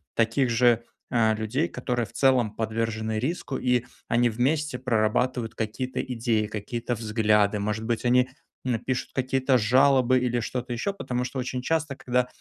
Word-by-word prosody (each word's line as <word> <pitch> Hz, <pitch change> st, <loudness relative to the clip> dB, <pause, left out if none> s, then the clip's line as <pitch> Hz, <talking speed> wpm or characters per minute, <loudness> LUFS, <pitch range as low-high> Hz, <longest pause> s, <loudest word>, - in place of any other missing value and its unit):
таких 115 Hz, +3 st, +2 dB
же, 120 Hz, 0 st, +3 dB, 0.3 s
а, 110 Hz, -3 st, +3 dB
людей, 110 Hz, +9 st, -1 dB
которые 125 Hz, -3 st, -2 dB
в -, -, -16 dB
целом 125 Hz, -5 st, +2 dB
подвержены 110 Hz, 0 st, -2 dB
риску. 140 Hz, +1 st, -2 dB
И 125 Hz, -1 st, +1 dB, 0.2 s
они 120 Hz, +1 st, +3 dB
вместе 135 Hz, +5 st, 0 dB
прорабатывают 120 Hz, 0 st, 0 dB
какие-то 115 Hz, +4 st, -3 dB
идеи, 115 Hz, -3 st, -1 dB
какие-то 115 Hz, +3 st, -3 dB
взгляды, 105 Hz, -2 st, +2 dB
может 105 Hz, +2 st, -2 dB
быть, 115 Hz, 0 st, -1 dB
они, 125 Hz, +1 st, +4 dB, 0.4 s
н 125 Hz, -3 st, +1 dB
пишут 130 Hz, +2 st, -3 dB
какие-то 130 Hz, 0 st, +2 dB
жалобы, 130 Hz, +2 st, +4 dB
или 125 Hz, -1 st, 0 dB
что-то 125 Hz, +1 st, -4 dB
еще. 120 Hz, +12 st, -2 dB
Потому 125 Hz, -10 st, -3 dB
что 130 Hz, +1 st, -4 dB
очень 125 Hz, 0 st, -3 dB
часто, 160 Hz, +1 st, -1 dB
когда 125 Hz, -1 st, 0 dB
120 Hz, 155 wpm, -26 LUFS, 110-130 Hz, 0.4 s, они